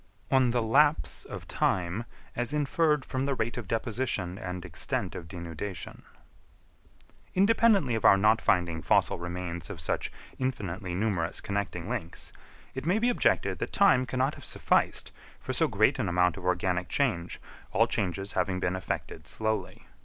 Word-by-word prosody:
On 130 -2 +4
the 120 -1 +1
Lapse 145 +7 +3
of - - -8
Time, 90 +5 0 0.3
as 120 +5 -1
inferred 150 0 +2
from 130 +1 -2
the 140 - 0
rate 120 -1 -2
of 120 -5 -6
deposition 110 -5 -2
and 90 -4 -5
extent 85 -3 -3
of 85 - -7
Denudation. 85 +1 -6 1.3
Independently 200 - +4
of 110 - -1
our 100 - +7
not 110 +3 +4
finding 85 -3 +1
fossil - - +2
remains 85 0 -5
of 100 -5 -7
such 80 - -2 0.3
infinitely 100 -8 -3
numerous 95 -4 -1
connecting 100 -2 -3
links, 85 - -5 0.4
it 130 - -5
may 185 +5 +3
be 235 +2 +2
objected 245 - +1
that - - -4
time 135 -11 +4
cannot 130 +4 0
have - - -12
sufficed - - 0 0.3
for - - -4
so - - +2
great 110 +8 +2
an 105 -7 0
amount 90 -1 +3
of 95 - -9
organic 90 0 0
change, 100 -12 0 0.3
all - - +4
changes 95 +1 -2
having 95 -2 0
been 90 0 0
effected 80 -4 -5
slowly. 110 +2 -3
105 Hz, 155 wpm, -29 LUFS, 90-130 Hz, 1.3 s, our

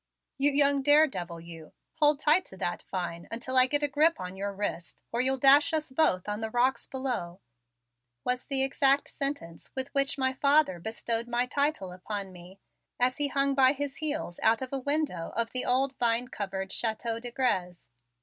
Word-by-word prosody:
"You 285 +1 +4
young 280 -1 +3
daredevil, 265 - +2
you, 165 -2 -12 0.2
hold 295 -2 +4
tight 315 +4 +3
to 190 - -11
that 175 - -3
vine 175 -2 -5
until 245 +3 -4
I 255 0 +7
get 290 +2 0
a - - +3
grip 310 +4 +2
on 180 +1 -7
your 200 +1 -4
wrist, 195 -4 -5
or 235 - 0
you'll 265 +1 +1
dash 280 +4 +5
us 310 -3 -2
both 260 - +1
on 210 +1 -3
the 220 - -3
rocks 245 +3 0
below," 245 -10 -4 0.8
was 250 0 -1
the 270 -1 +2
exact 275 +1 +2
sentence 275 - -5
with 265 0 -3
which 275 +2 +2
my 260 -1 0
father 280 - +2
bestowed 230 +4 -3
my 240 +1 0
title 280 -7 -1
upon 195 +2 -6
me 180 +1 -14 0.4
as 250 +1 +2
he 290 -1 +1
hung 275 0 +1
by 265 0 +5
his 285 -1 -5
heels 305 - -3
out 225 +3 +2
of 260 - -7
a 270 - -1
window 285 - -2
of 230 0 -1
the 255 - -1
old 265 +2 +1
vine 240 +1 +1
covered 195 -4 -5
Chateau 225 0 -2
de 245 +1 -6
Grez. 185 - -2
255 Hz, 190 wpm, -28 LUFS, 200-280 Hz, 0.8 s, I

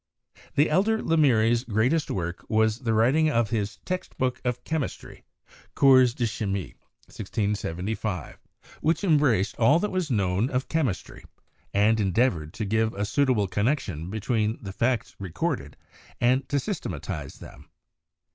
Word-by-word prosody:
The 145 - +4
elder 200 +8 +2
Lemery's 120 - +3
greatest 125 +7 +1
work 85 -1 -3
was 110 +1 +2
the 115 -4 -1
writing 135 +8 +3
of 115 -6 +1
his 105 -3 -2
text 185 0 -4
book 125 -1 -1
of 125 -1 -2
chemistry, 160 -4 -5 0.5
'Cours 130 -3 +5
de 120 - 0
Chimie' 100 -4 -3 0.3
(1675), 100 - -3 0.4
which 165 +6 +1
em 160 -6 +4
braced 110 -9 +1
all 135 +7 +5
that 210 +4 -1
was 185 -4 -1
known 100 0 +1
of 130 -1 -2
chemistry, 140 - -2 0.5
and 105 +3 +3
endeavored 95 -6 +1
to 110 - -3
give 110 +2 0
a 100 +1 -1
suitable 125 -2 +2
connection 95 - -1
between 110 +1 -1
the 95 -2 -6
facts 120 +2 -1
recorded, 90 -6 -3 0.4
and 125 +2 +2
to 140 - +1
systematize 110 - -5
them. - - -13
115 Hz, 135 wpm, -26 LUFS, 100-135 Hz, 0.5 s, Cours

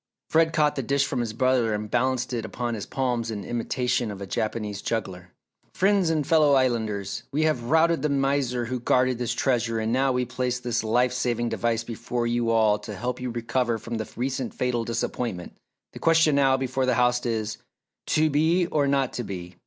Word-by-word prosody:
Fred 160 0 +4
caught 150 -2 +2
the 135 - -1
dish 135 +2 +1
from - - -2
his 120 -2 -2
brother 120 -2 +1
and 105 0 -5
balanced 130 0 0
it 115 -2 -2
upon 120 +1 -3
his 105 -3 -5
palms 125 -3 -1
in 105 -3 -5
imitation 120 0 -1
of 100 -2 -7
a 100 - -5
Japanese 105 0 -3
juggler. 95 -5 -4 0.4
"Friends 195 -2 +3
and 155 -3 0
fellow 155 -2 +4
Islanders! 110 -7 0
We 150 +3 +1
have 155 -7 0
routed 160 +4 +3
the 150 - 0
miser 135 -3 0
who 125 +2 -3
guarded 125 +1 +2
this 120 -2 -1
treasure 120 -3 0
and 110 +1 -1
now 135 +1 +2
we 125 0 0
place 125 0 -2
this 120 -1 -1
life 120 +3 +2
saving 120 -2 -1
device 115 -1 -1
before 120 +1 -3
you 120 0 0
all 110 -2 +3
to 105 - -7
help 125 +5 -4
you 125 - -3
recover 120 0 -1
from 115 +1 -5
the 110 - -5
recent 130 0 -3
fatal 125 -2 0
disappointment. 115 -4 -3 0.4
The - - -9
question 165 -2 +4
now 135 -1 +4
before 130 0 -1
the 125 - +2
house 125 0 +2
is, 110 -3 -2 0.5
'To 155 0 +2
be 160 +5 +3
or 150 -4 +1
not 135 -2 +1
to 120 - -3
be! 90 -4 -7
125 Hz, 200 wpm, -25 LUFS, 115-135 Hz, 0.5 s, Fred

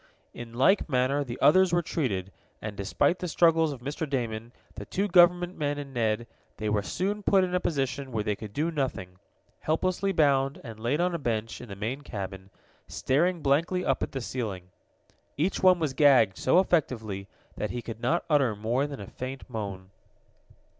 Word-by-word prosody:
In 115 -1 -9
like 170 +9 +3
manner 135 +2 +1
the 120 -3 -6
others 185 +4 +5
were 175 0 +2
treated, 100 - -2 0.3
and, 105 -1 -6
despite 100 - +1
the 180 - -3
struggles 165 -1 +3
of 135 -4 -8
Mr. 145 +3 -4
Damon, 115 -4 -3 0.2
the - - -8
two 200 +2 -1
government 175 -1 +4
men 145 -1 -1
and 140 -2 -7
Ned, 115 -1 0 0.3
they 110 0 -2
were 105 -1 +1
soon 195 - -2
put 195 -1 +4
in 180 -1 -2
a 180 - +2
position 135 -5 -2
where 110 -3 -1
they 105 0 -1
could 105 0 -9
do 155 +8 -1
nothing 95 - -3 0.4
helplessly 185 +5 0
bound, 140 -4 +2
and 115 -4 -9
laid 120 +7 0
on 180 0 +1
a 170 - -2
bench 115 -4 -3
in 120 - -10
the 100 - -6
main 115 +8 -4
cabin, 95 -6 -7 0.4
staring 170 +5 0
blankly 165 +6 +1
up - - +1
at - - -2
the 135 - -4
ceiling. 105 -7 -4 0.7
Each 165 +7 0
one 185 -1 +6
was 155 -5 -1
gagged 130 -10 +5
so 130 - +2
effectively 115 - 0 0.3
that - - -3
he 120 -1 -5
could 115 0 -7
not 155 +8 +1
utter 140 -8 +2
more 120 +7 0
than 140 -5 -7
a - - -6
faint 130 +5 -7
moan. 100 -5 -6
135 Hz, 190 wpm, -27 LUFS, 110-165 Hz, 0.7 s, one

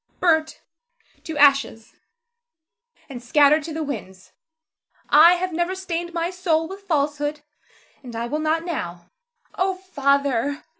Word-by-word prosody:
Zara. 470 - -43
Burnt 320 -3 +1 0.6
to 320 -2 -5
ashes, 275 -6 +3 1.1
and 255 -4 -9
scattered 290 +5 +4
to 330 - -6
the 315 0 -3
winds. 195 -10 -8 0.8
I 320 +4 +8
have 360 0 -3
never 345 +3 -1
stained 345 -2 -4
my 340 +1 -2
soul 335 -3 0
with 385 +3 -9
falsehood, 295 -2 -1 0.6
and 245 -4 -10
I 230 +1 -3
will 295 +6 -3
not 315 +2 0
now. 175 - -6 0.4
Oh, 375 0 -1
Father! 280 -6 0
310 Hz, 135 wpm, -22 LUFS, 280-345 Hz, 1.1 s, I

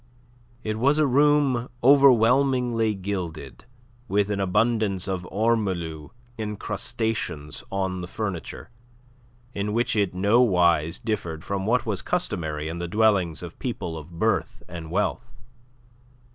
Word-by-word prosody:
It 110 0 -3
was 140 +5 +3
a 155 - +4
room 140 -2 +3
overwhelmingly 125 -3 +4
gilded, 90 -7 -5 0.4
with 105 -1 +1
an 100 - -1
abundance 105 -1 +1
of 90 -2 -3
ormolu 95 -8 -1 0.3
encrustations 105 -6 -3
on 95 -2 -2
the 90 - -6
furniture, 100 +1 -5 0.8
in 100 +1 -2
which 120 +1 +1
it 100 -4 0
nowise 90 -6 +3
differed 85 -8 -4
from 100 0 -3
what 125 +2 +2
was 105 -4 -2
customary 80 - -2
in 85 +2 -5
the 85 - -3
dwellings 95 -4 +2
of 85 -1 -9
people 120 -10 -4
of 80 +2 -10
birth - - 0
and 85 -2 -8
wealth. - - -1
100 Hz, 120 wpm, -25 LUFS, 90-115 Hz, 0.8 s, a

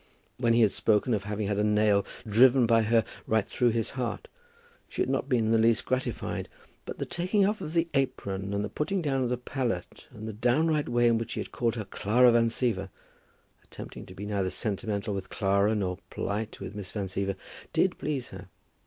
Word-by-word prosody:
When 120 -2 +2
he 120 - +4
had 110 -3 +5
spoken 110 +2 +2
of 100 -2 -1
having 105 0 -2
had 105 0 0
a - - +2
nail 105 -1 +3 0.2
driven 125 +4 +6
by 115 0 +4
her 110 +1 +3 0.2
right 110 -2 +1
through 125 - +2
his 115 -1 0
heart, 125 -3 -4 0.6
she - - -8
had - - -3
not 135 +1 -1
been 120 -4 +2
in 110 - +1
the 115 - +4
least 115 0 +3
gratified; 130 -2 -2 0.4
but - - -6
the - - -3
taking 190 +3 +1
off 210 +2 0
of 155 - -5
the 165 0 +3
apron, 100 -8 -1
and 100 +1 -1
the - - -5
putting 175 - -2
down 135 -3 0
of 125 - 0
the 125 - 0
palette, 120 -7 -4
and 110 +1 -9
the 110 - -4
downright 145 +7 +1
way 120 0 +3
in 115 -1 +3
which 115 - -4
he - - -3
had - - -5
called 120 -1 0
her 110 -3 -4
Clara 120 +6 +4
Van 115 0 +4
Siever, 110 -5 -1 0.7
attempting - - -10
to 95 - -11
be 100 - -6
neither 100 -3 -1
sentimental 105 0 -2
with 95 -1 -5
Clara, 100 +2 +2
nor 95 -3 -2
polite 105 +2 -3
with 95 0 -7
Miss 100 -3 -6
Van 100 -3 -3
Siever, 95 +1 -2 0.4
did - - +1
please 135 -5 -2
her. - - -10
115 Hz, 215 wpm, -28 LUFS, 100-125 Hz, 0.7 s, driven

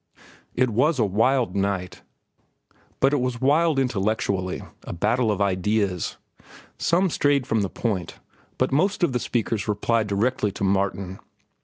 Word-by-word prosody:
It 125 -1 +2
was 140 +8 +2
a 115 - +3
wild 115 +5 +1
night—but 100 - -4
it 145 - +2
was 125 -2 -2
wild 150 +4 +3
intellectually, 100 -6 -1 0.2
a - - -6
battle 110 +6 +1
of 105 - -2
ideas. 100 -1 0 0.6
Some 180 +1 +2
strayed 145 -3 +2
from 110 -2 +1
the 100 - -1
point, 100 -8 -3 0.4
but - - +1
most 180 +7 +1
of 150 - +2
the 125 - +1
speakers 115 -4 -2
replied 110 +1 +1
directly 105 +1 0
to 100 - -5
Martin. 95 -1 -1
110 Hz, 140 wpm, -24 LUFS, 100-130 Hz, 0.6 s, a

